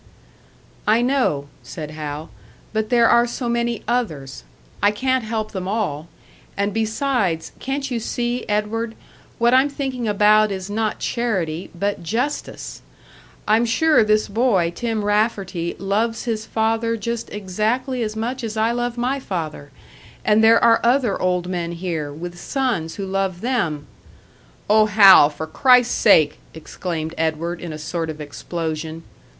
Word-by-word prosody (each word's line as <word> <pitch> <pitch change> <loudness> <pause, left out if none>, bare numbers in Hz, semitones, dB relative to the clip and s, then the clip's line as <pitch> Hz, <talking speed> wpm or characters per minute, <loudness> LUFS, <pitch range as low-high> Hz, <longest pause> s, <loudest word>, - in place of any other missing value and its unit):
"I 225 +3 +4
know," 245 - +1
said 155 -2 -7
Hal, 150 -1 -6 0.4
"but 220 0 -1
there 235 -2 +5
are 235 +1 +4
so 240 +1 -4
many 235 -1 -1
others; 160 - -2 0.4
I 205 - +5
can't 260 +4 0
help 220 -1 -3
them 185 -3 -4
all. 185 -8 -2 0.5
And 200 0 0
besides, 220 - -1
can't 275 0 -3
you 240 - -1
see, 240 +2 -2
Edward 220 +2 -1 0.4
what 235 +1 +3
I'm 265 +3 +5
thinking 265 -4 -3
about 210 +1 +4
is 190 +1 -5
not 215 0 -1
charity, 190 -9 -2
but 200 +2 -2
justice. 240 - -3 0.7
I'm 220 +2 +4
sure 300 +4 +3
this 215 0 +2
boy, 200 -6 +2
Tim 225 0 -2
Rafferty, 200 -5 0
loves 220 +4 -1
his 220 -2 -3
father 225 +1 0
just 235 +2 -4
exactly 215 +6 -2
as 215 -1 -2
much 240 +4 -3
as 220 -1 -4
I 220 +2 +2
love 240 0 -2
my 255 +3 0
father; 160 - -5 0.6
and 215 +1 +4
there 225 +1 +6
are 230 -1 +5
other 240 -3 +2
old 180 -1 +1
men 175 -2 -3
here, 165 -4 -3
with 175 +4 -8
sons 235 - -2
who 200 - -4
love 190 -2 -2
them 170 - -1 0.4
" - - -30
"Oh, 215 +1 +5
Hal, 195 -8 +8
for 155 +1 -6
Christ's 250 - +4
sake!" 160 -8 +4 0.2
exclaimed 160 0 -5
Edward, 165 +2 -1
in 170 - -6
a 155 - -6
sort 160 +1 -3
of 155 -1 -6
explosion. 160 +1 -5
215 Hz, 150 wpm, -21 LUFS, 170-235 Hz, 0.7 s, Hal